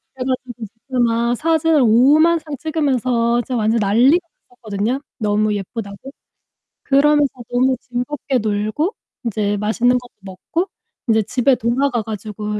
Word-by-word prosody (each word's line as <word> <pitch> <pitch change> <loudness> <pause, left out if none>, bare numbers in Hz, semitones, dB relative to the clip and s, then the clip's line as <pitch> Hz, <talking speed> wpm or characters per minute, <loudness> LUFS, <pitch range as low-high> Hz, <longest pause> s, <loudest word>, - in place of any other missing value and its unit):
그래 260 -1 -5
가지고 255 -1 -3
이제 225 +5 -11
막 235 +1 +1
사진을 320 +1 +2
오만상 300 +7 +4
찍으면서 255 -6 0
진짜 250 +2 -4
완전 225 0 +1
난리가 255 - +3 0.2
났었거든요, 225 +1 -3 0.2
너무 210 -1 +1
예쁘다고. 200 +4 -7 0.7
그러면서 290 0 +3 0.2
너무 255 +2 +2
즐겁게 255 +3 -3
놀고 215 - -1 0.3
인제 210 -2 -1
맛있는 235 +4 +2
것도 245 0 -10
먹고 195 - -4 0.4
인제 220 -1 +3
집에 255 +5 +2
돌아가 245 +1 0
가지고 210 0 -5
245 Hz, 315 characters per minute, -19 LUFS, 215-275 Hz, 0.7 s, 오만상